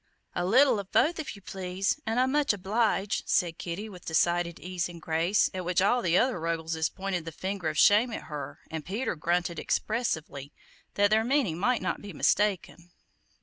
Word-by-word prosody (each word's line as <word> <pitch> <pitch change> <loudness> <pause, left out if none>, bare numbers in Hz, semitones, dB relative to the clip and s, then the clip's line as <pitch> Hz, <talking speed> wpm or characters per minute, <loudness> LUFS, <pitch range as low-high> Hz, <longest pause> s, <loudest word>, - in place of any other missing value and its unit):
"A - - -1
little 245 +4 +4
of 195 -1 -8
both 330 +2 +3
if 305 - -5
you 200 - -15
please, 190 +6 -2
an' 225 +2 0
I'm 255 +1 +3
much 290 -4 +2
obliged," 205 +1 0
said 170 -2 +1
Kitty 180 +5 -5
with 185 -5 -12
decided 170 +1 +1
ease 180 -1 -3
and 170 -1 -10
grace, 165 +5 +2
at 185 -1 -4
which 180 0 +1
all 225 +6 +3
the 175 -2 +2
other 250 -6 +2
Ruggleses 165 -1 -1
pointed 190 -3 -3
the 165 - -7
finger 185 0 -3
of 155 - -5
shame 215 +4 +5
at - - -5
her 150 -2 -7
and 160 -1 -4
Peter 210 - -2
GRUNTED 170 +2 -1
expressively, 160 - -2 0.4
that 205 0 +3
their 220 +1 +4
meaning 240 - +1
might 245 +5 +1
not - - -2
be 205 -2 -9
mistaken. 185 -1 0
185 Hz, 190 wpm, -28 LUFS, 170-220 Hz, 0.4 s, shame